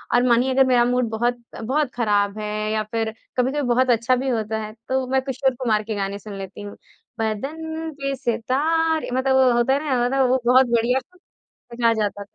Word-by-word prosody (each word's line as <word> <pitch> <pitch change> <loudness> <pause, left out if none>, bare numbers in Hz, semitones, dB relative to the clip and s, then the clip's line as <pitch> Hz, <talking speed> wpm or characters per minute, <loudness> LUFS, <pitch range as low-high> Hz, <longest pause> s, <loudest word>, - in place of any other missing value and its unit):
और 245 - +4
मानिए 245 +2 +3
अगर 270 0 +5
मेरा 245 -2 +4
मूड 245 -1 +1
बहुत-बहुत 240 +4 -2
ख़राब 205 -3 +1
है 210 0 -4 0.2
या 215 0 0
फिर 225 -1 -1 0.2
कभी-कभी 265 +4 +1
बहुत 255 +1 +2
अच्छा 235 +2 +3
भी 265 +2 -2
होता 220 -2 -1
है, 215 0 -7 0.2
तो 260 0 0
मैं 265 +1 +1
किशोर 265 -1 -1
कुमार 220 -4 0
के 215 0 -4
गाने 200 0 -3
सुन 205 0 -9
लेती 195 +1 -8
हूँ। 205 0 -8 0.4
बदन 315 +9 -3
पे 275 0 -1
सितारें 300 +7 0
मतलब 265 +1 +1
वो 260 -1 +5
होता 240 +3 +3
है 280 - +1
ना 255 -5 +1
मतलब 265 0 +2
वो 255 0 +2
बहुत 255 +2 +6
बढ़िया 240 +2 +2 0.7
मज़ा 235 -1 +1
आ - - +3
जाता 205 -2 -2
था। 205 - -33
245 Hz, 200 wpm, -22 LUFS, 220-265 Hz, 0.7 s, बहुत